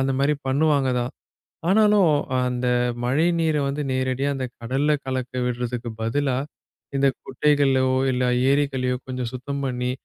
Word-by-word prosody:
அந்த 135 0 +1
மாரி 145 +2 +3
பண்ணுவாங்க 140 -1 +2
தான். 120 +3 -3 0.6
ஆனாலும் 210 -3 +5 0.4
அந்த 125 0 -2 0.4
மழை 135 +7 +2
நீரை 160 -2 +1
வந்து 140 +2 -2
நேரடியா 130 +1 0
அந்த 130 -1 -2
கடல்ல 135 +6 0
கலக்கவிடுறதுக்கு 125 -2 -3
பதிலா, 130 +3 0 0.6
இந்தக் 135 -2 +2
குட்டைகள்ளையோ, 135 -1 +2 0.3
இல்ல 125 0 0 0.3
ஏரிகள்ளையோ 135 -3 +1
கொஞ்சம் 125 -2 -3
சுத்தம் 140 +2 -4
பண்ணி, 125 -1 -1
130 Hz, 125 wpm, -23 LUFS, 125-145 Hz, 0.6 s, ஆனாலும்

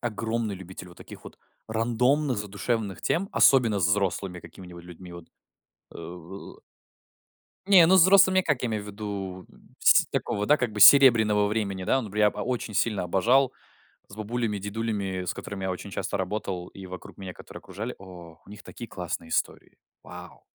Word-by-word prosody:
огромный 110 -2 -3
любитель 95 0 -11
вот 85 - -16
таких - - -12
вот - - -13 0.3
рандомных 125 +5 0
задушевных 105 0 -3
тем, 195 +4 -1
особенно 115 -7 +4
с 90 - +2
взрослыми 95 -1 -1
какими-нибудь 85 +1 -13
людьми. 90 0 -12
Вот, 85 -1 -12 0.7
э - - -8 1.7
Не, 190 -4 +7
ну, 185 +3 +5
с - - +7
взрослыми, 190 0 +5
как 150 -9 -1
я 125 - -1
имею 110 -2 -3
в - - -12
виду? 100 -3 -6
Н - - -21 0.2
сь - - +5
такого, 105 +1 -2
да, 150 - +4
как 125 -5 -3
бы, 105 - -6
серебряного 110 -4 +7
времени. 100 -3 -3
Да, 135 - +2
н 115 - -5
бря 105 +1 +2
ба - - -8
очень 120 -4 -4
сильно 105 0 0
обожал 120 +9 +2 0.6
с 100 - -13
бабулями, 110 0 -3
дедулями, 100 -2 -4
с 90 - -3
которыми 95 -2 -7
я 95 - -1
очень 90 +2 -7
часто 95 0 -4
работал, 95 -2 -4
и 95 -1 -11
вокруг 90 0 -10
меня, 95 -2 -7
которые - - -12
окружали. 105 +6 -7
О, 90 -4 -13
у - - -21
них 105 - -11
такие 120 - -10
классные 90 -3 -6
истории. - - -3 0.3
Вау! - - -12
105 Hz, 175 wpm, -26 LUFS, 95-120 Hz, 1.7 s, Не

